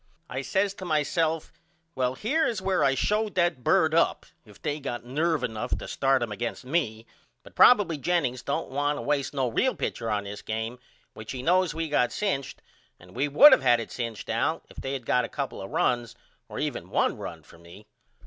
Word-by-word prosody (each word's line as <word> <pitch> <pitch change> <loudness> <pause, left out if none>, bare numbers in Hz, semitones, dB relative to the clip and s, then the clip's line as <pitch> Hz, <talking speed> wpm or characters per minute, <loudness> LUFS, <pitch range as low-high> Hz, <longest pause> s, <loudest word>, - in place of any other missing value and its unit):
I - - -2
says 195 0 0
to 195 - -10
myself 160 0 0 0.4
Well 130 -2 -1
here 280 - +1
is 225 - -2
where 190 -1 +1
I 135 - +3
show 210 - +1
that 175 -9 0
bird - - +3
up - - +2 0.2
if 105 -2 -17
they 150 -1 -3
got 120 -4 -5
nerve 155 +5 0
enough 110 +2 -2
to - - -7
start 135 -2 +1
him 115 - -4
against 120 +4 -4
me 125 -7 -1 0.4
but - - -15
probily 200 -10 +5
Jennings 130 -7 0
don't - - -3
want 145 +2 0
to - - -5
waste 145 -2 0
no 135 -2 +1
real 255 - +1
pitcher 115 -1 -3
on 105 -1 0
this 100 +1 -7
game 110 +3 -4 0.3
which 110 +2 -8
he 130 -1 -6
knows 180 +1 +2
we 165 0 -2
got 135 -5 +1
cinched 165 -11 -3 0.4
and 90 +1 -17
we 145 - +1
would 275 - +8
of - - +4
had 120 -2 +4
it 115 - -6
cinched 115 -3 -5
Al - - -1
if - - -17
they 135 - -4
had 135 -3 -4
of - - -21
got 125 - +3
a - - -4
couple 140 -7 -4
of 95 - -7
runs 120 -1 0 0.3
or - - -8
even - - -3
1 - - +1
run - - -7
for 85 - -18
me. 85 +5 -14
135 Hz, 215 wpm, -27 LUFS, 120-170 Hz, 0.4 s, would